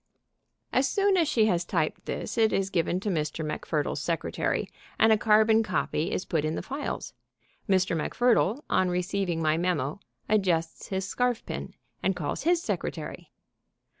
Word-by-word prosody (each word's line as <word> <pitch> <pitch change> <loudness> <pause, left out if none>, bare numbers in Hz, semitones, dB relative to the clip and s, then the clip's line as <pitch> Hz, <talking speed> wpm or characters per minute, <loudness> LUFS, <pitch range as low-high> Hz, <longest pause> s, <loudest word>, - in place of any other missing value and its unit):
As 265 +2 +3
soon 400 -1 +3
as 340 -4 +3
she 225 -7 +3
has 180 -5 +2
typed - - -2
this - - -4
it 225 -2 +3
is 195 0 0
given 175 0 +1
to 210 - -2
Mr. 155 -2 -2
MacFurdle's 150 -1 -2
secretary, 165 +1 -1 0.3
and 220 0 +6
a - - +6
carbon 220 +1 +4
copy 185 -5 -1
is - - -2
put 160 -3 0
in 155 +1 -1
the - - -4
files. 280 +2 -4 0.6
Mr. 185 -2 +3
MacFurdle, 240 - +2
on 185 - +2
receiving 180 -1 -1
my 155 0 +2
memo, 165 -3 -1 0.3
adjusts 175 -6 0
his 190 -1 -2
scarfpin 245 +4 -2 0.3
and 190 - +1
calls 150 -5 -3
his 345 0 +3
secretary. - - -4
190 Hz, 155 wpm, -27 LUFS, 165-220 Hz, 0.6 s, and